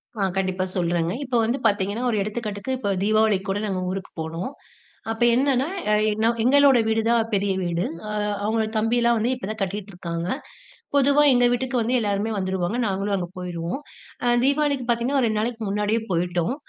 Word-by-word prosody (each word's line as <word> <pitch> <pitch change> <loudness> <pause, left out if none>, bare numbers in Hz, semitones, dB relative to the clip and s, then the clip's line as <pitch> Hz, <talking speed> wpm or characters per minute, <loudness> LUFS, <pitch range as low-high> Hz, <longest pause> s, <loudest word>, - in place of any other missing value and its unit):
ஆ, - - -8 0.2
கண்டிப்பா 185 -1 0
சொல்றேங்க. 170 -1 0
இப்போ 245 -2 0
வந்து 235 +4 0
பாத்தீங்கன்னா, 205 +3 -1
ஒரு 215 - 0
எடுத்துக்காட்டுக்கு 215 +2 -3
இப்போ 205 - -2
தீபாவளிக்கு 215 -2 +2
கூட 200 - -1
நாங்க 185 -2 -2
ஊருக்கு 190 0 -5
போனோம். 165 +8 -4 0.6
அப்ப 225 +2 -1
என்னன்னா, 265 +2 +2 0.2
அ - - +4 0.2
என்னோ, 220 +2 +1
எங்களோட 275 +1 +6
வீடு 225 0 +2
தான் 230 -1 +3
பெரிய 200 0 +1
வீடு. 175 0 -1 0.3
அ, - - -3 0.3
அவங்களோட 220 +1 +1
தம்பிலாம் 235 +2 +2
வந்து 225 +3 0
இப்ப 250 - -7
தான் 220 - -7
கட்டிட்ருக்காங்க. 180 -3 -4 0.7
பொதுவா 285 +1 +4
எங்க 245 -1 +4
வீட்டுக்கு 255 +1 -1
வந்து 235 +3 0
எல்லாருமே 205 0 -1
வந்துருவாங்க. 190 +3 -1
நாங்களும் 195 +1 -1
அங்க 175 -2 -3
போயிருவோம். 175 +3 -4 0.5
அ, - - 0 0.2
தீபாவளிக்கு 280 -1 +1
பாத்தீங்கன்னா, 240 +4 +1
ஒரு 245 - +2
2 215 -1 0
நாளைக்கு 230 0 -3
முன்னாடியே 210 +3 0
போயிட்டோம். 175 +3 0
215 Hz, 170 wpm, -23 LUFS, 190-240 Hz, 0.7 s, எங்களோட